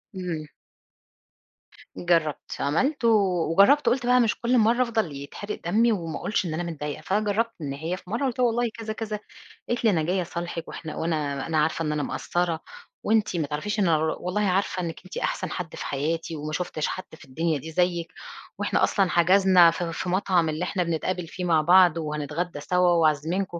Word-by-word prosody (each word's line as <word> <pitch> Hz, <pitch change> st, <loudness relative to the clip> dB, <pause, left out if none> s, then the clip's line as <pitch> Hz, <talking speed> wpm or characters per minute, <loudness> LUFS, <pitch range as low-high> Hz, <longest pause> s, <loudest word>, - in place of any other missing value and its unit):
إمم. 170 Hz, -5 st, -4 dB, 1.5 s
جرّبت، 165 Hz, -4 st, 0 dB
عملت 240 Hz, -, 0 dB
و -, -, +6 dB, 0.4 s
وجرّبت 235 Hz, -, +5 dB
وقُلت 245 Hz, +1 st, +2 dB
بقى 250 Hz, +1 st, +5 dB
مش 230 Hz, -3 st, +1 dB
كل 245 Hz, +1 st, +2 dB
مرّة 235 Hz, +2 st, +3 dB
أفضل 225 Hz, -9 st, -1 dB
يتحرِق 170 Hz, +9 st, -7 dB
دمّي 225 Hz, +7 st, +3 dB
وما 165 Hz, -6 st, -3 dB
اقولش 205 Hz, -, -1 dB
إن 160 Hz, -, -3 dB
أنا 175 Hz, -, -2 dB
متضايقة، 150 Hz, -1 st, -5 dB
فأنا 200 Hz, +6 st, 0 dB
جرّبت 225 Hz, +3 st, 0 dB
إن 140 Hz, -2 st, -3 dB
هي 165 Hz, +6 st, -4 dB
في 185 Hz, -, -15 dB
مرّة، 235 Hz, +7 st, -1 dB
قُلت 255 Hz, -2 st, -2 dB
لها 245 Hz, -, +4 dB
والله 235 Hz, +1 st, 0 dB
كذا، 220 Hz, -1 st, -5 dB
كذا 215 Hz, -1 st, -4 dB, 0.5 s
قالت 240 Hz, 0 st, -1 dB
لي 225 Hz, -, +5 dB
أنا 165 Hz, -6 st, +1 dB
جاية 180 Hz, +3 st, 0 dB
أصالحِك 170 Hz, -1 st, -5 dB
وإحنا 155 Hz, -2 st, -7 dB
وأنا 150 Hz, -4 st, -2 dB
أنا 160 Hz, -, 0 dB
عارفة 155 Hz, +1 st, +1 dB
إن 150 Hz, -, -1 dB
أنا 150 Hz, -1 st, -1 dB
مقصّرة، 175 Hz, -2 st, -1 dB, 0.4 s
وأنتِ 215 Hz, -4 st, +1 dB
ما 150 Hz, -3 st, -1 dB
تعرفيش 205 Hz, +9 st, -3 dB
أنا 170 Hz, -5 st, +3 dB
ر 155 Hz, +1 st, 0 dB
والله 185 Hz, +4 st, -2 dB
عارفة 190 Hz, -1 st, 0 dB
إنِّك 165 Hz, -2 st, -5 dB
أنتِ 185 Hz, -, -8 dB
أحسن -, -, -2 dB
حد 175 Hz, -3 st, -5 dB
في -, -, -6 dB
حياتي 160 Hz, +4 st, -2 dB
وما 150 Hz, +1 st, -5 dB
شوفتِش 160 Hz, -3 st, -2 dB
حد 185 Hz, -, -4 dB
في 160 Hz, -, -15 dB
الدنيا 160 Hz, +4 st, -1 dB
دي 160 Hz, +4 st, -8 dB
زيِّك، 175 Hz, 0 st, 0 dB, 0.5 s
وإحنا -, -, 0 dB
أصلًا 195 Hz, -3 st, +2 dB
حَجَزنا 180 Hz, 0 st, +5 dB
في 165 Hz, 0 st, -4 dB
في 180 Hz, -, -4 dB
مطعم 180 Hz, -3 st, +2 dB
اللي 155 Hz, +3 st, -2 dB
إحنا 180 Hz, 0 st, -1 dB
بنتقابل 170 Hz, +1 st, -2 dB
فيه 180 Hz, +2 st, -6 dB
مع 160 Hz, -3 st, +3 dB
بعض، 175 Hz, 0 st, +6 dB
وهنتغدّى 150 Hz, +2 st, -3 dB
سوا 180 Hz, +4 st, +2 dB
وعازمينكم 170 Hz, +3 st, +1 dB
175 Hz, 195 wpm, -25 LUFS, 160-205 Hz, 1.5 s, و